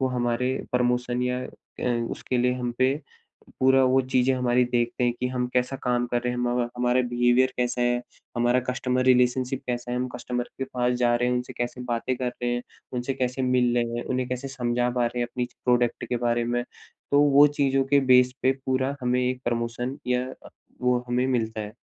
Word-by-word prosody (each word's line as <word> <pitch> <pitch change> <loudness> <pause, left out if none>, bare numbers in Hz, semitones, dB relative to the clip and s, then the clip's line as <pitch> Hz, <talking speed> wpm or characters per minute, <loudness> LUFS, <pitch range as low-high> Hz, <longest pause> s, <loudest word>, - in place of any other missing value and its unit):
वो 130 - +1
हमारे, 125 0 0 0.2
प्रमोशन 125 0 +1
या 125 0 -1
अ, 120 -1 -4
उसके 125 - -2
लिए 125 +1 +2
हम 125 -1 -3
पे 130 +1 +3 0.7
पूरा 130 0 +5
वो 130 +1 +4
चीज़ें 130 0 +2
हमारी 125 -1 +2
देखते 120 0 0
हैं 120 - +2
कि 125 - +1
हम 125 -1 -1
कैसा 125 +2 +1
काम 120 -1 +1
कर 120 0 -1
रहे 125 0 -1
हैं। 125 - -4
हम 125 0 0 0.2
हमारा 125 +1 +2
बिहेवियर 120 +2 +3
कैसा 125 0 -1
है, 120 0 +2 0.4
हमारा 120 +1 +3
कस्टमर 125 0 0
रिलेशनशिप 125 +1 +2
कैसा 120 0 -3
है, 125 - -1
हम 125 +1 -1
कस्टमर 125 0 -3
के 135 - -1
पास 125 -1 -1
जा 120 0 +4
रहे 125 +1 +1
हैं, 125 - +1
उनसे 125 0 -4
कैसे 120 +1 -3
बातें 120 +2 -1
कर 125 0 -2
रहे 120 0 -3
हैं, 120 - -3 0.3
उनसे 125 +1 -2
कैसे 125 +1 -2
मिल 125 -1 +2
रहे 120 - +3
हैं, - - -4
उन्हें 130 -1 -2
कैसे 125 +2 -4
समझा 125 -2 -1
पा 120 -1 +1
रहे 120 +1 -3
हैं - - -1
अपनी 125 +1 -2 0.2
प्रोडक्ट 120 -1 +1
के 125 - 0
बारे 120 0 +1
में? 120 +1 0 0.5
तो 145 - +6
वो 145 0 +7
चीज़ों 135 -1 +3
के 140 - +6
बेस 125 0 +6
पे 130 - +4
पूरा 130 +1 0
हमें 125 0 +1
एक 130 0 -4
प्रमोशन 120 +2 -2
या 125 0 0 0.6
वो 125 0 +3
हमें 125 +1 +1
मिलता 110 -4 -1
है। 105 +1 -7
125 Hz, 210 wpm, -25 LUFS, 120-130 Hz, 0.7 s, वो